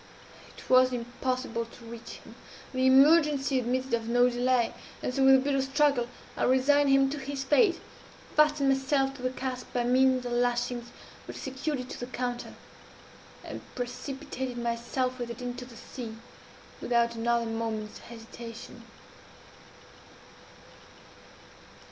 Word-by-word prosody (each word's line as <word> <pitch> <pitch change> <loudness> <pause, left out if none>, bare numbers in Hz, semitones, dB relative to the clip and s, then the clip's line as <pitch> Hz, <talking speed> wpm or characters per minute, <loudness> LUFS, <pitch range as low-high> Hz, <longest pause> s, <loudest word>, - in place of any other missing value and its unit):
It - - -12
was 255 0 +5
impossible 245 0 -2
to 230 +1 -15
reach 230 0 -9
him; - - -12 0.4
the 260 0 +2
emergency 280 0 +5
admitted 255 +2 -2
of 230 -1 0
no 245 +1 +4
delay; 245 -1 +1 0.3
and 250 - -2
so, 270 - +1
with 265 0 +8
a - - +7
bitter 275 +1 +1
struggle, 270 -2 +2 0.3
I - - -5
resigned 280 +3 +4
him 270 0 +5
to 295 - -4
his 275 0 -4
fate, 345 - +3 0.6
fastened 300 -2 +4
myself 270 0 +1
to 270 - -11
the 255 - 0
cask 255 -1 -5
by 245 - +1
means 255 +1 +3
of 245 - -3
the 240 - 0
lashings 240 0 -1 0.4
which - - -7
secured 265 +1 -3
it 255 - -10
to - - -7
the 245 - -5
counter, 245 -1 -4 0.9
and - - -7
precipitated 255 +1 -5
myself 240 +2 -2
with 240 -1 -4
it 235 +1 -7
into 245 0 -5
the 240 -2 -13
sea, 225 -2 -8 0.6
without 235 -1 +2
another 235 0 0
moment's 225 -1 -4
hesitation. 230 0 -10
255 Hz, 140 wpm, -28 LUFS, 240-270 Hz, 0.9 s, with